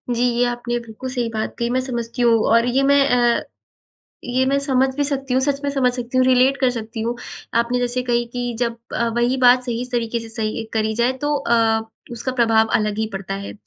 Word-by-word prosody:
जी 240 Hz, -, 0 dB
ये 245 Hz, 0 st, +2 dB
आपने 240 Hz, 0 st, -2 dB
बिल्कुल 235 Hz, +2 st, -8 dB
सही 245 Hz, -2 st, -2 dB
बात 220 Hz, -1 st, -4 dB
कही। 235 Hz, -, 0 dB
मैं 255 Hz, +1 st, +1 dB
समझती 240 Hz, -1 st, -4 dB
हूँ, 235 Hz, -1 st, +5 dB, 0.2 s
और 230 Hz, +1 st, +4 dB
ये 260 Hz, +3 st, +1 dB
मैं 280 Hz, 0 st, +4 dB
अ, 240 Hz, -1 st, +3 dB, 0.8 s
ये 255 Hz, +1 st, +1 dB
मैं 280 Hz, +1 st, +2 dB
समझ 270 Hz, -1 st, +2 dB
भी 290 Hz, -, +1 dB
सकती 275 Hz, -2 st, -2 dB
हूँ, 260 Hz, -, +3 dB
सच 280 Hz, 0 st, 0 dB
में 280 Hz, -, 0 dB
समझ 260 Hz, -3 st, +1 dB
सकती 245 Hz, +1 st, -3 dB
हूँ 255 Hz, -, +5 dB
रिलेट 260 Hz, +1 st, +4 dB
कर 255 Hz, -1 st, +3 dB
सकती 225 Hz, -1 st, -6 dB
हूँ। 235 Hz, +2 st, -1 dB, 0.5 s
आपने 240 Hz, +1 st, -1 dB
जैसे 245 Hz, 0 st, -1 dB
कही 240 Hz, -1 st, 0 dB
कि 245 Hz, -1 st, -3 dB
जब 235 Hz, -1 st, -1 dB, 0.2 s
अ, 235 Hz, 0 st, 0 dB
वही 240 Hz, +2 st, +2 dB
बात 250 Hz, 0 st, +5 dB
सही 240 Hz, 0 st, -3 dB
तरीके 235 Hz, -1 st, -1 dB
से 225 Hz, -, -9 dB
सही 225 Hz, 0 st, -3 dB
करी 220 Hz, 0 st, 0 dB
जाए 240 Hz, +3 st, +2 dB
तो 295 Hz, 0 st, +1 dB
अ, 230 Hz, -4 st, +2 dB, 0.3 s
उसका 245 Hz, +3 st, -4 dB
प्रभाव 225 Hz, -3 st, +3 dB
अलग 210 Hz, 0 st, -2 dB
ही 220 Hz, -, 0 dB
पड़ता 195 Hz, 0 st, -4 dB
है। 200 Hz, 0 st, -6 dB
240 Hz, 225 wpm, -21 LUFS, 230-255 Hz, 0.8 s, हूँ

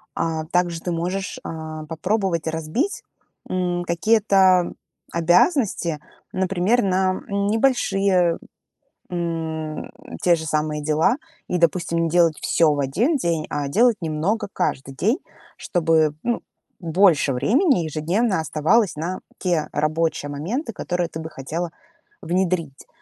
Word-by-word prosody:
А 160 Hz, -1 st, -1 dB
также 175 Hz, 0 st, 0 dB
ты 175 Hz, -, -3 dB
можешь, 180 Hz, +4 st, -3 dB
а, 155 Hz, -1 st, -6 dB
попробовать 175 Hz, +1 st, -1 dB
разбить, 160 Hz, -, -2 dB, 0.5 s
м, 180 Hz, -1 st, -1 dB
какие-то 190 Hz, -1 st, +3 dB, 0.4 s
обязанности, 175 Hz, -, +2 dB, 0.3 s
например, 190 Hz, +5 st, +1 dB
на, 185 Hz, -1 st, +1 dB
м, 200 Hz, 0 st, -1 dB
небольшие, 195 Hz, -7 st, +2 dB, 0.7 s
м, 160 Hz, -3 st, -3 dB, 0.3 s
те 175 Hz, -1 st, +5 dB
же 160 Hz, -1 st, -6 dB
самые 150 Hz, 0 st, -1 dB
дела, 155 Hz, -, +2 dB, 0.3 s
и, 180 Hz, -, 0 dB
допустим, 170 Hz, 0 st, +1 dB
не 165 Hz, -, 0 dB
делать 165 Hz, -2 st, +3 dB
всё 165 Hz, -2 st, +3 dB
в 145 Hz, -, -3 dB
1 200 Hz, -, +1 dB
день, 170 Hz, -, -1 dB
а 145 Hz, -1 st, -2 dB
делать 230 Hz, -, +3 dB
немного 165 Hz, +8 st, -1 dB
каждый 135 Hz, -5 st, -2 dB
день, 215 Hz, -, +1 dB, 0.4 s
чтобы, 160 Hz, -3 st, +2 dB
ну, 240 Hz, -1 st, 0 dB, 0.4 s
больше 170 Hz, -4 st, +3 dB
времени 250 Hz, -, +3 dB
ежедневно 170 Hz, +7 st, 0 dB
оставалось 160 Hz, +7 st, +2 dB
на 170 Hz, +5 st, -3 dB, 0.2 s
те 175 Hz, -5 st, 0 dB
рабочие 155 Hz, 0 st, 0 dB
моменты, 215 Hz, -, -3 dB
которые 175 Hz, -3 st, -2 dB
ты 160 Hz, -, -6 dB
бы 160 Hz, 0 st, -6 dB
хотела 160 Hz, +4 st, -4 dB, 0.5 s
внедрить. 175 Hz, -5 st, -1 dB
170 Hz, 125 wpm, -22 LUFS, 160-195 Hz, 0.7 s, те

